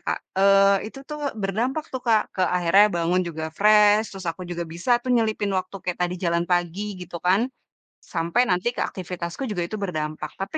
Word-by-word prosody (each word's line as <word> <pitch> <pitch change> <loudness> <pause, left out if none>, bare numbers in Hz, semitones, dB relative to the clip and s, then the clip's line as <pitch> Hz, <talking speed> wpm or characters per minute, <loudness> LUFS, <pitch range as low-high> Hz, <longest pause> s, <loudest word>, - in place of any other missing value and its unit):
Kak. - - 0 0.2
Eee, 195 +1 +4
itu - - -11
tuh, 300 0 -5 0.2
berdampak 240 +10 -1
tuh 260 - -3
Kak, 220 -2 +4
ke 185 - 0
akhirnya 180 +4 +5
bangun 175 +2 +2
juga 160 -1 -5
fresh 210 +1 +6
terus 190 -1 -8
aku 165 +3 -9
juga 175 0 -3
bisa 175 +9 -4
tuh 255 - -3
nyelipin 220 -3 +1
waktu 185 - -6
kayak 180 -1 -3
tadi 175 - -5
jalan 170 0 +1
pagi 175 +1 0 0.2
gitu 180 -1 -7
kan. 185 +3 +4 0.7
Sampai 170 +6 +1
nanti 180 +4 +1
ke - - -6
aktivitasku 180 +4 -6
juga 190 - -3
itu 215 - -5
berdampak, 155 -4 -4
tapi 195 +11 -3
190 Hz, 185 wpm, -24 LUFS, 175-210 Hz, 0.7 s, fresh